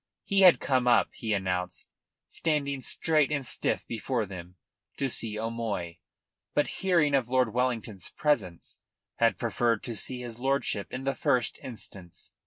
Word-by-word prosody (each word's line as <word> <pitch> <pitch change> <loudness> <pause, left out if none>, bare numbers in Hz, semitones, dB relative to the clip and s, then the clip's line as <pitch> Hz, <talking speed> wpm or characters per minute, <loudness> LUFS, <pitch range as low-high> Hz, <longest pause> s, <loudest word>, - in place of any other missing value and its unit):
He 195 -1 +2
had 180 -3 +8
come 130 -2 +1
up, 120 - +5
he 110 - -4
announced, 90 -3 -2 0.4
standing 140 -4 -1
straight 155 +1 +2
and 140 -3 -1
stiff - - 0
before 115 0 -2
them, 90 -2 -9 0.4
to 135 -1 0
see 110 -2 -1
O'Moy, 110 -6 -3 0.6
but 145 - +4 0.2
hearing 170 -6 +3
of 130 -4 +2
Lord 125 -3 +2
Wellington's 115 -5 -1
presence, 120 - -1 0.4
had 115 0 +3
preferred 115 -1 0
to 120 - -4
see 125 +4 -5
his 120 -1 -6
lordship 135 -6 0
in 130 +1 -5
the 135 0 0
first 125 -3 +1
instance. 100 -7 -9
120 Hz, 150 wpm, -28 LUFS, 105-135 Hz, 0.6 s, had